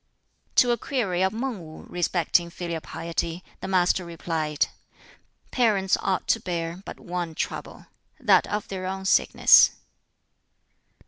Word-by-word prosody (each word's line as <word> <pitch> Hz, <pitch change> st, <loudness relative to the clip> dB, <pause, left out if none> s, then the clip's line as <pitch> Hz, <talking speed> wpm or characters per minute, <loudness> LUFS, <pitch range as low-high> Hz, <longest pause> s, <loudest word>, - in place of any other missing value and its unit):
To 245 Hz, -, +5 dB
a 235 Hz, -, 0 dB
query 200 Hz, -11 st, -1 dB
of 190 Hz, 0 st, +2 dB
Mang 235 Hz, 0 st, -3 dB
Wu 155 Hz, 0 st, -11 dB
respecting 175 Hz, 0 st, 0 dB
filial 170 Hz, -1 st, -5 dB
piety, 170 Hz, +2 st, -4 dB, 0.2 s
the -, -, -6 dB
Master 185 Hz, -1 st, +2 dB
replied, 160 Hz, -3 st, -1 dB, 0.9 s
"Parents 205 Hz, -6 st, +2 dB
ought 190 Hz, -1 st, -1 dB
to -, -, +3 dB
bear 170 Hz, 0 st, -4 dB
but -, -, -8 dB
one 175 Hz, -2 st, -4 dB
trouble -, -, -5 dB, 0.3 s
that -, -, +4 dB
of 210 Hz, +2 st, -3 dB
their 185 Hz, -3 st, -5 dB
own 190 Hz, 0 st, -4 dB
sickness." -, -, +6 dB
180 Hz, 130 wpm, -25 LUFS, 170-195 Hz, 0.9 s, sickness